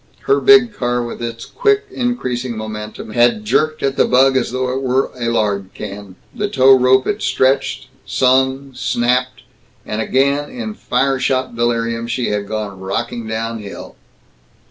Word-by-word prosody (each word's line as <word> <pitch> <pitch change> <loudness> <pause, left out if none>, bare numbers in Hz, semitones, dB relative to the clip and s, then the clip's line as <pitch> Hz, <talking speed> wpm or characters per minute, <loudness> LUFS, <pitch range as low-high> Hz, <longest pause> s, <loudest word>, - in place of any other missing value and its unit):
Her 415 - +2
big 405 - +6
car, 120 -7 -1
with 120 0 -7
its 115 -1 -5
quick 420 -3 +1
increasing 130 - -2
momentum, 110 0 -7
had 120 - +2
jerked 155 -6 +1
at 135 0 0
the - - +4
bug 135 +1 +4
as 130 - +1
though 130 0 -1
it 135 - -2
were 130 0 0
a 120 -2 -4
lard 100 -4 0
can. 100 -1 -8 0.2
The 205 0 -2
tow 135 -5 +6
rope 130 0 +4
had 210 +1 -2
stretched, 130 0 +1 0.2
sung, 130 +1 +1
snapped, 125 0 0 0.4
and 105 +1 -3
again, 140 +5 +1
in 240 -4 -5
fire 135 -6 0
shot 130 -2 -1
delirium, 115 0 -1
she 120 +1 -1
had 105 -1 -2
gone 105 -3 -4
rocking 115 +4 -4
down 115 +1 -3
hill. 100 -2 -9
125 Hz, 160 wpm, -18 LUFS, 115-135 Hz, 0.4 s, big